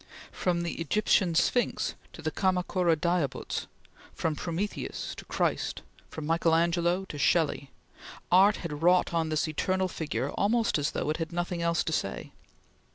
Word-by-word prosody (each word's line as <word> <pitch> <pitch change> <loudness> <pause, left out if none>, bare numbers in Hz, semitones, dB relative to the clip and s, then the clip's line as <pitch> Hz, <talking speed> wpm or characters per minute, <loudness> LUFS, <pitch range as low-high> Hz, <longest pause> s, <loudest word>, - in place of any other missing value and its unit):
From 175 -2 0
the 170 -1 -4
Egyptian 185 -1 +2
Sphinx 245 +8 +1 0.2
to - - -11
the - - -1
Kamakura 180 -2 +1
Daibuts; 170 -4 -1 0.5
from 160 -2 -1
Prometheus 180 +6 -4
to - - -10
Christ; - - -1 0.3
from 155 - -6
Michael 165 +1 +2
Angelo 170 +2 +1
to 150 -5 -8
Shelley, 150 -3 +2 0.6
art 195 +3 +6
had 150 -4 -6
wrought 180 +1 +4
on 165 -1 +1
this 155 +1 0
eternal 185 +5 0
figure 160 -4 -3
almost 225 -3 +1
as 145 - 0
though 150 - -2
it 155 - -2
had 165 0 -4
nothing 175 0 -2
else 170 0 +1
to 160 - -2
say. 95 - -3
170 Hz, 155 wpm, -29 LUFS, 160-180 Hz, 0.6 s, art